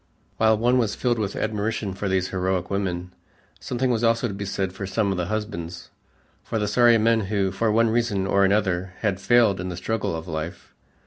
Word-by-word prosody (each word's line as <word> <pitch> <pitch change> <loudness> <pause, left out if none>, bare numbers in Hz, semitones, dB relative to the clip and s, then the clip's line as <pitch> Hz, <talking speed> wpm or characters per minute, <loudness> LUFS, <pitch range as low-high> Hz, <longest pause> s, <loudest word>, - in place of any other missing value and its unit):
While 110 -1 +4
one 120 +3 +3
was 110 -4 0
filled 120 -2 0
with 105 -2 -2
admiration 110 -1 -2
for 100 +1 -3
these 95 -1 0
heroic 95 -1 -1
women, 90 -2 -2 0.5
something 125 0 -1
was 115 -1 0
also 115 +1 +2
to 100 - -5
be 100 +1 -5
said 95 -1 -2
for 95 0 -5
some 100 +1 0
of 95 - -2
the 90 -1 -2
husbands, 95 -5 -5 0.5
for 115 - -3
the 105 -1 0
sorry 120 +2 +5
men 115 +1 +3
who, 100 -3 +1
for 110 +3 0
one 115 +1 +3
reason 115 -5 0
or 100 0 +3
another, 95 -2 +1
had 100 -3 -1
failed 105 -2 +3
in 90 - -4
the 90 - -5
struggle 95 -1 -2
of 80 +1 -6
life. 80 +2 -6
100 Hz, 205 wpm, -24 LUFS, 95-115 Hz, 0.5 s, sorry